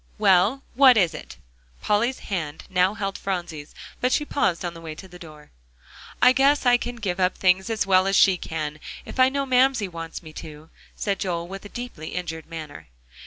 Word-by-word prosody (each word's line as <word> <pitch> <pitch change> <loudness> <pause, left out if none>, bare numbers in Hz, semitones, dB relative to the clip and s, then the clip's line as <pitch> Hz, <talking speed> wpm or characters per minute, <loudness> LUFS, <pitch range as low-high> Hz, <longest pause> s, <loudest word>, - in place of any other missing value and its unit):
"Well, 205 +6 +3
what 260 -2 +7
is 175 -5 +3
it?" 155 - -10 0.4
Polly's 235 +5 +1
hand 160 -6 -4
now 185 +2 +2
held 195 -2 -4
Phronsie's, 175 -6 -5 0.2
but 250 - +1
she 295 - +1
paused 190 -13 0
on 175 - -3
the 165 - -11
way 160 -2 -7
to 190 - -11
the 180 -1 -14
door. 155 -3 -13 0.7
"I 250 - +8
guess 275 +2 +3
I 245 0 +6
can 245 0 -5
give 195 -6 -3
up 185 0 +1
things 190 +2 +2
as 220 -2 0
well 190 -1 +4
as 195 - +1
she 190 -1 +6
can, 155 -3 -5 0.3
if - - -9
I 255 0 +6
know 275 +1 -2
Mamsie 260 -4 +3
wants 165 -1 -8
me 155 -1 -11
to," 155 0 -10 0.2
said 200 -2 -2
Joel, 170 -2 -3
with 195 +2 -9
a - - -9
deeply 240 -11 -7
injured 165 -3 -5
manner. 155 - -9
190 Hz, 200 wpm, -24 LUFS, 165-235 Hz, 0.7 s, I